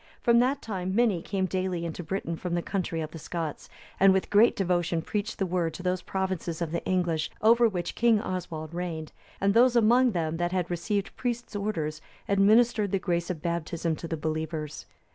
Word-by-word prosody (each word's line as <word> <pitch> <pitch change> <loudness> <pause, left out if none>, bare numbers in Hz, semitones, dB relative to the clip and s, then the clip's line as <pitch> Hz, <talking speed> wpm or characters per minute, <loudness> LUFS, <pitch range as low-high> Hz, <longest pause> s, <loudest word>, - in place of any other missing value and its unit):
From 235 0 +5
that 260 +3 +1
time 190 -3 -3
many 220 -7 +3
came 190 +1 -1
daily 185 -2 -2
into 170 +1 -5
Britain 170 0 -3
from 175 +1 -3
the 175 - -1
country 175 -4 -2
of 155 0 -5
the 165 - -8
Scots, 160 -1 -5 0.3
and 195 0 +7
with 190 0 0
great 215 +3 +5
devotion 175 -3 0
preached 210 +3 -3
the 195 - 0
Word 175 -3 -1
to 180 - -8
those 180 0 0
provinces 185 -4 -3
of 170 -3 -2
the 170 - -2
English, 170 -4 0
over 230 +1 +5
which 175 -4 -3
King 230 -2 +3
Oswald 170 -5 -5
reigned, 165 -3 -4 0.3
and 200 0 +2
those 245 +2 +5
among 240 +1 +5
them 165 -2 -1
that 175 0 -1
had 180 -2 -1
received 195 +4 -2
priest's 240 -3 -3
orders,(298) 160 -7 -2 0.3
administered 215 +1 +4
the 195 - +2
grace 175 -2 -1
of 165 -4 -4
Baptism 170 -1 -1
to 165 - -6
the 165 - -3
believers. 155 -1 -4
180 Hz, 195 wpm, -28 LUFS, 165-205 Hz, 0.3 s, and